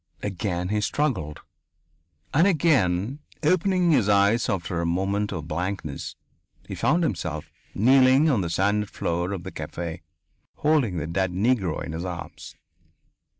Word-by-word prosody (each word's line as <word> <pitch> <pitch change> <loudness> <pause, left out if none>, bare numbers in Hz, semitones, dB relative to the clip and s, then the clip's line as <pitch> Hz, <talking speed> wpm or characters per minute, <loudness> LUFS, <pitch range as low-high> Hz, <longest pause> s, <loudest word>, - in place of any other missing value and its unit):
Again 90 -2 -2
he 105 0 0
struggled. 105 - -1 0.9
And 165 +7 +5
again, 135 - +2 0.2
opening 180 +2 +3
his 110 -9 +3
eyes 100 +3 +3
after 85 -3 -2
a - - -1
moment 100 +4 0
of 80 -5 -5
blankness, 85 -2 -4 0.5
he - - -6
found 170 +5 +1
himself 80 - -3 0.2
kneeling 130 +5 +5
on 130 -10 +2
the 85 - -2
sanded 100 +4 +1
floor 85 +2 -2
of 95 -3 -4
the - - -7
cafe, 85 -1 -6 0.5
holding 145 - +1
the 75 - -2
dead 95 +3 -1
Negro 100 -4 0
in - - -6
his 80 +2 -4
arms. 90 -2 -7
100 Hz, 140 wpm, -25 LUFS, 85-130 Hz, 0.9 s, And